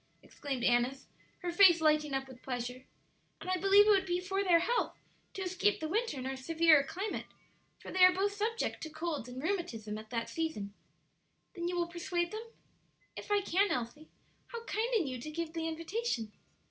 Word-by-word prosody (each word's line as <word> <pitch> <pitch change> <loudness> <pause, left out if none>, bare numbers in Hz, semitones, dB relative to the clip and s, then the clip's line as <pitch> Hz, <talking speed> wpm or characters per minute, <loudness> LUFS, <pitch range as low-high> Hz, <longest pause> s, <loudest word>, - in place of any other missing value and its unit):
exclaimed 270 -4 -5
Annis, 245 +2 +2 0.4
her 350 - -1
face 345 -1 +7
lighting 305 -2 +2
up 270 0 -2
with 255 -1 -13
pleasure; 250 0 -5 0.5
"and - - -10
I 370 - +2
believe 395 +2 +6
it 425 - +5
would 385 -2 +3
be 350 0 0
for 385 +2 -1
their 355 -3 +5
health 475 +7 0 0.4
to 385 - -3
escape 375 +3 +1
the 315 - -3
winter 430 - -1
in 255 - -5
our 265 0 -2
severer 320 +2 +4
climate, 375 +9 -4 0.5
for - - -10
they 370 0 +4
are 365 - +9
both 390 +2 0
subject 440 +3 -2
to 315 - -5
colds 315 -6 -4
and 255 +2 -7
rheumatism 235 - -3
at 215 0 -12
that 230 -1 -2
season." 315 -12 -3 0.8
"Then 345 -2 -3
you 355 - -2
will 345 -1 +1
persuade 345 0 -2
them?" 440 +2 -6 0.7
"If - - -8
I 410 -1 +3
can, 395 +2 +2
Elsie. 250 +6 -4 0.4
How 470 -1 -7
kind 460 +2 -2
in 395 -7 +2
you 255 -2 -4
to 305 - -6
give 325 +1 -4
the 325 -1 -2
invitation!" 325 - -3
335 Hz, 195 wpm, -32 LUFS, 270-385 Hz, 0.8 s, are